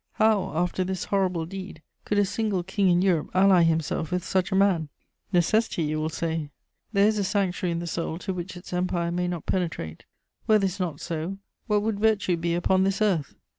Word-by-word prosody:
How, 215 -3 +2
after 180 +2 0
this 185 0 -3
horrible 185 -4 0
deed, 185 -2 -8 0.2
could 210 - 0
a 205 - +4
single 205 -2 -1
king 190 +1 +1
in 175 +1 +3
Europe 175 -6 +1
ally 190 -1 +6
himself 160 -1 +1
with 180 -1 -1
such 185 +1 0
a - - +1
man? 190 -6 +3 0.4
Necessity, 180 +1 +2
you 155 0 -1
will 155 +1 -1
say. 160 -2 -3 0.4
There 200 -2 +4
is 215 -1 +1
a - - +1
sanctuary 185 -2 0
in - - -2
the 170 - -4
soul 165 -1 -3
to 190 +2 -4
which 180 +1 -6
its 175 - -10
empire 180 -1 0
may 180 +1 -1
not 175 -2 -4
penetrate; 165 - -3 0.4
were 215 - +6
this 195 -1 -1
not 165 -5 -3
so, 170 +3 -4 0.3
what 210 -2 +2
would 215 -2 -1
virtue 205 -4 +2
be 170 0 -1
upon 185 +2 +2
this 195 0 0
earth? 190 -9 0
180 Hz, 205 wpm, -26 LUFS, 170-195 Hz, 0.4 s, ally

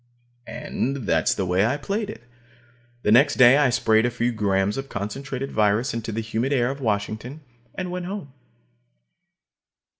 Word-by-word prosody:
And 135 -1 -3
that's - - +2
the 95 - -1
way 90 +2 +2
I 120 +6 +1
played 200 +9 -3
it. 210 - -9 0.8
The 105 - +2
next 140 +5 +5
day 130 +1 +7
I 145 -3 +4
sprayed 110 -2 +3
a 120 - +2
few 120 0 -1
grams 100 -2 0
of 135 0 -5
concentrated 135 +7 -5
virus 110 +5 +1
into 115 -1 -4
the 110 +1 -2
humid 115 +4 -2
air 125 -1 +2
of 140 +1 -8
Washington, 110 +5 -3 0.3
and 180 -1 -4
went 180 -1 -4
home. 185 -9 -6
120 Hz, 160 wpm, -24 LUFS, 110-140 Hz, 0.8 s, day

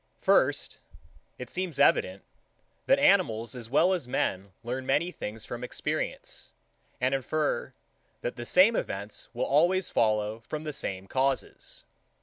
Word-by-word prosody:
83. - - -28
First, - - +2 0.6
It 125 -1 -8
seems 180 -5 -3
evident, 95 -8 +3 0.6
that - - +5
animals 115 +1 +3
as 120 -3 -8
well 170 +8 +4
as 175 -9 -2
men 95 -5 -1
learn 125 +3 -3
many 150 +7 +1
things 110 -7 -7
from 120 0 -6
experience, 125 - -4 0.5
and 125 +1 +1
infer, 145 +3 -1 0.5
that 120 - -3
the 120 -1 -6
same 195 +6 +5
events 100 - -4
will - - 0
always 175 +6 +2
follow 110 0 +1
from 150 +7 -6
the 150 -1 -4
same 95 -7 -4
causes. 135 +5 -2
125 Hz, 140 wpm, -28 LUFS, 110-155 Hz, 0.6 s, that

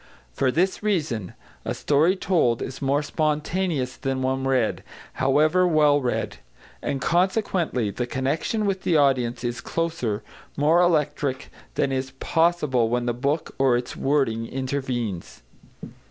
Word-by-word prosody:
For 135 - +1
this 185 +7 +1
reason, 150 - -1 0.3
a - - -3
story 155 +6 +3
told 165 - +1
is 130 - -7
more 140 +2 +1
spontaneous 155 -3 -1
than 135 -1 -2
one 130 0 -1
read, 130 -5 +1 0.4
however 155 +7 +4
well 150 -3 +4
read. 125 -2 -2 0.4
And, 135 - -2
consequently, 175 - +1
the 125 +4 -3
connection 145 - -1
with 195 -2 -1
the 170 - +2
audience 130 -4 +2
is 120 0 -3
closer, 125 -11 -2 0.3
more 155 +4 +4
electric, 150 -5 0 0.2
than 135 - +1
is 130 0 -2
possible 150 -8 +2
when 120 +1 0
the 120 - 0
book 140 +6 -2
or 130 -3 +4
its 120 0 -5
wording 130 -5 0
intervenes. 130 - -4
140 Hz, 135 wpm, -24 LUFS, 125-165 Hz, 0.4 s, however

